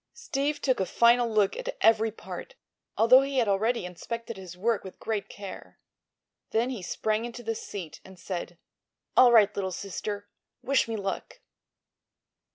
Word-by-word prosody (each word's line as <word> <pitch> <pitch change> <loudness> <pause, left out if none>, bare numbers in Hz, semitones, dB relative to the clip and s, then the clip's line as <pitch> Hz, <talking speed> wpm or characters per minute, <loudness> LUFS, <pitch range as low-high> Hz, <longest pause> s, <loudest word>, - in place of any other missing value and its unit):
Steve 295 - -2
took 260 -5 +1
a 190 - +1
final 235 +3 +4
look 210 -3 +2
at - - -5
every 225 0 +4
part, 365 - -9 0.4
although 250 +4 +7
he 275 0 -2
had 240 -4 +3
already 215 +2 +1
inspected 230 +6 -6
his 185 -2 -10
work 220 +2 0
with 190 - -10
great 215 -2 -3
care. 200 -2 -9 0.7
Then 235 +3 +1
he 240 -6 -5
sprang 215 +5 -1
into 240 0 -7
the 225 0 -1
seat 190 -6 -7
and 190 -1 -14
said: 175 -1 -5 0.6
"All 250 -1 +8
right, 215 -3 +6
little 190 -1 -2
sister. 205 +2 -5 0.4
Wish 275 -2 +2
me 225 - -3
luck!" 200 - -4
220 Hz, 160 wpm, -28 LUFS, 195-240 Hz, 0.7 s, All